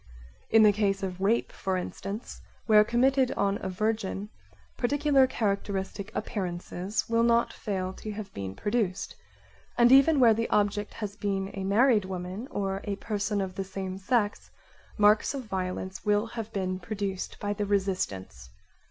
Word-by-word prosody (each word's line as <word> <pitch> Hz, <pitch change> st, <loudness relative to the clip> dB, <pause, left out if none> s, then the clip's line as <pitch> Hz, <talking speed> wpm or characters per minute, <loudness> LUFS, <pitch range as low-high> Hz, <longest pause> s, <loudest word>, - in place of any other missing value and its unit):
In 225 Hz, 0 st, +6 dB
the 210 Hz, -, +7 dB
case 200 Hz, -1 st, 0 dB
of 185 Hz, -1 st, -4 dB
rape, 215 Hz, +4 st, +1 dB
for 190 Hz, -1 st, -2 dB
t 180 Hz, -, 0 dB
instance, 200 Hz, +5 st, -7 dB, 0.2 s
where 210 Hz, -1 st, +7 dB
committed 255 Hz, +3 st, +2 dB
on 200 Hz, 0 st, 0 dB
a 190 Hz, -, -3 dB
virgin, 210 Hz, 0 st, -2 dB, 0.5 s
particular 280 Hz, +1 st, +3 dB
characteristic 200 Hz, -2 st, -2 dB
appearances 185 Hz, +1 st, -3 dB
will 230 Hz, 0 st, +2 dB
not 235 Hz, 0 st, +3 dB
fail 190 Hz, -3 st, -3 dB
to 215 Hz, -, -7 dB
have 205 Hz, -1 st, -7 dB
been 95 Hz, -1 st, -5 dB
produced, 205 Hz, -3 st, -1 dB, 0.6 s
and 240 Hz, 0 st, +6 dB
even 275 Hz, +3 st, +6 dB
where 235 Hz, -3 st, +7 dB
the 230 Hz, +1 st, -1 dB
object 205 Hz, 0 st, 0 dB
has 205 Hz, -2 st, -5 dB
been 195 Hz, -2 st, -2 dB
a 195 Hz, -, -4 dB
married 210 Hz, +2 st, +4 dB
woman 185 Hz, +5 st, -5 dB
or 195 Hz, -1 st, -2 dB
a 205 Hz, -, -2 dB
person 205 Hz, 0 st, -2 dB
of' 190 Hz, -1 st, -3 dB
the 195 Hz, -, -3 dB
same 190 Hz, 0 st, -5 dB
sex 205 Hz, +1 st, 0 dB, 0.5 s
marks 210 Hz, +5 st, +4 dB
of 270 Hz, -, -4 dB
violence 190 Hz, -2 st, -4 dB
will 210 Hz, +1 st, +2 dB
have 225 Hz, -1 st, -6 dB
been 185 Hz, -3 st, -2 dB
produced 195 Hz, 0 st, -4 dB
by 205 Hz, 0 st, -1 dB
the 205 Hz, 0 st, -3 dB
resistance. 180 Hz, -, -2 dB
205 Hz, 160 wpm, -28 LUFS, 190-225 Hz, 0.6 s, the